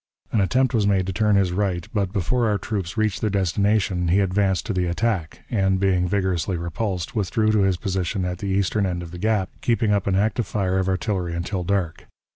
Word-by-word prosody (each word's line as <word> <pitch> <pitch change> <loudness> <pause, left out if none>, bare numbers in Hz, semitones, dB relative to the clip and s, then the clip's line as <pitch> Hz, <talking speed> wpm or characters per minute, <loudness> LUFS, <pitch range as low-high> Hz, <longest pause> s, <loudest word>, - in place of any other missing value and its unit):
An 110 - +2
attempt 130 +7 +2
was 105 -4 +2
made 95 -2 +2
to 95 - -3
turn 105 +1 +2
his 95 -3 +2
right, 90 -2 -1
but, 100 -4 0
before 115 +4 0
our 105 - +1
troops 95 -2 -4
reached 110 -3 0
their 110 - +1
destination, 100 -1 +1
he 90 +4 +3
advanced 95 -1 +1
to 110 - -2
the 90 -1 0
attack, 90 -2 -1
and, 95 -4 +2
being 95 -2 +2
vigorously 95 -1 0
repulsed, 90 +3 -3
withdrew 110 +1 +1
to 110 - +2
his 95 -2 +2
position 95 +1 -2
at 90 0 -3
the 100 - -4
eastern 100 +1 +1
end 90 -1 -3
of 85 - -9
the 90 - -8
Gap, 105 -2 0
keeping 115 -2 +1
up 100 -2 +1
an 95 - +2
active 105 +2 +1
fire 95 -2 0
of 95 0 0
artillery 95 -3 -1
until 90 +2 -3
dark. 90 -3 -2
95 Hz, 215 wpm, -23 LUFS, 90-105 Hz, -, he